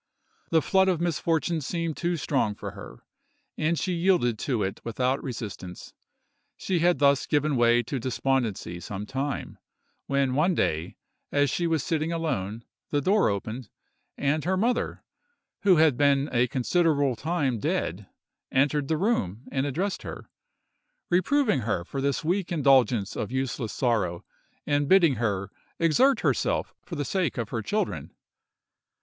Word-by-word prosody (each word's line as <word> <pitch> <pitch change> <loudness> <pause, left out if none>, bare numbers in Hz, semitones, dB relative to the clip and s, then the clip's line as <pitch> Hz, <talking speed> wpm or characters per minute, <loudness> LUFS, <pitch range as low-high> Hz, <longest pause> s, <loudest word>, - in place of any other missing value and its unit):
The 160 -2 +3
flood 190 0 +3
of 180 -4 +2
misfortune 165 -1 0
seemed 165 +2 -2
too 175 0 -1
strong 135 -9 0
for - - -6
her, - - -12 0.5
and 160 +2 0
she 185 - -1
yielded 170 - +2
to 120 -7 -1
it 95 0 -4
without 125 +4 0
resistance. 105 -8 -7 0.6
She 185 -3 -1
had 175 +1 +3
thus 140 -1 +3
given 150 -1 +1
way 120 0 +4
to 130 +3 -3
despondency 120 -7 -1
some 100 +3 -6
time, 135 +4 -4 0.5
when 140 -2 +1
one 165 +6 +2
day, 80 - -1 0.4
as 145 -2 +2
she 175 - 0
was 160 -3 0
sitting 160 0 -1
alone, 115 - -3 0.2
the 145 - +1
door 195 - +3
opened, 110 +3 -4 0.5
and 145 +2 0
her 185 +2 0
mother, 235 +5 0 0.6
who 200 -4 +5
had 155 -5 +4
been 140 0 +3
a 125 0 +2
considerable 140 0 +1
time 140 -4 -1
dead, - - -2 0.4
entered 140 +1 +2
the 160 - +1
room 130 - 0
and 135 0 0
addressed 185 +8 -2
her, - - -8 0.8
reproving 210 - +3
her 105 -7 -2
for 135 +7 -4
this 140 +2 0
weak 180 +3 -1
indulgence 130 - +3
of 105 - -3
useless 130 -3 -2
sorrow, 105 -9 0 0.4
and 145 -1 +1
bidding 170 - +5
her 100 -4 -1 0.3
exert 250 - +3
herself - - 0
for 170 - -8
the 145 -2 -2
sake 180 -7 -1
of 115 -4 -3
her 115 - -2
children. 210 - -2
140 Hz, 150 wpm, -26 LUFS, 120-170 Hz, 0.8 s, who